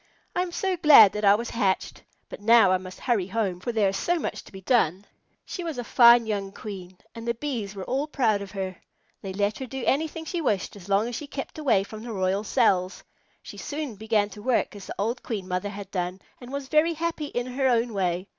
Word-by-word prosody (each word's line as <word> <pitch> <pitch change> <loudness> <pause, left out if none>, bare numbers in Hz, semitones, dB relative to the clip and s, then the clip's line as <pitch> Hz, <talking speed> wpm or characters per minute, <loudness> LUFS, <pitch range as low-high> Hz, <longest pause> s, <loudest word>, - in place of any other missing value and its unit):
I 355 - +2
am 360 -1 -3
so 380 +1 -1
glad 295 - +8
that 210 - -4
I 200 0 +7
was 235 +2 -4
hatched. 195 -5 -1 0.3
But - - -10
now 225 -2 +6
I 185 - +3
must 185 0 -10
hurry 220 -8 0
home, 195 -3 -1
for 240 - -3
there 215 -4 +2
is 195 - -3
so 350 - 0
much - - -4
to - - -15
be 190 -1 -10
done." 190 -4 +1 0.4
She 360 - -6
was 325 -5 -4
a 245 - -3
fine 235 -1 +6
young 200 -3 -3
Queen, 185 -3 -8 0.2
and 230 0 -8
the 235 - 0
Bees 230 -7 -4
were 195 - -5
all 270 +8 -1
proud 225 -9 +1
of 200 - -7
her. 190 -2 -5 0.4
They 195 - -5
let 205 +2 -1
her 260 - -5
do 265 +1 -6
anything 320 +3 0
she 340 +1 -3
wished 210 - -1
as 200 -1 -12
long 200 +3 +2
as 245 - -5
she 295 - -6
kept 275 +2 -6
away 235 -10 +3
from 215 +2 -9
the 230 0 -6
royal 190 +1 0
cells. 185 -2 +1 0.4
She - - -10
soon 295 -3 -4
began 215 0 0
to 210 - -10
work 245 -2 0
as 200 - -10
the - - -6
old 225 +5 -1
Queen 200 -5 -5
Mother 185 +2 -2
had 200 -1 -8
done, 180 0 -3 0.2
and 245 0 -11
was 280 -1 -4
very 310 +3 +3
happy 325 -1 -2
in 245 -3 -3
her 260 +1 0
own 235 -2 +1
way. 180 -2 -1
220 Hz, 240 wpm, -26 LUFS, 195-260 Hz, 0.4 s, glad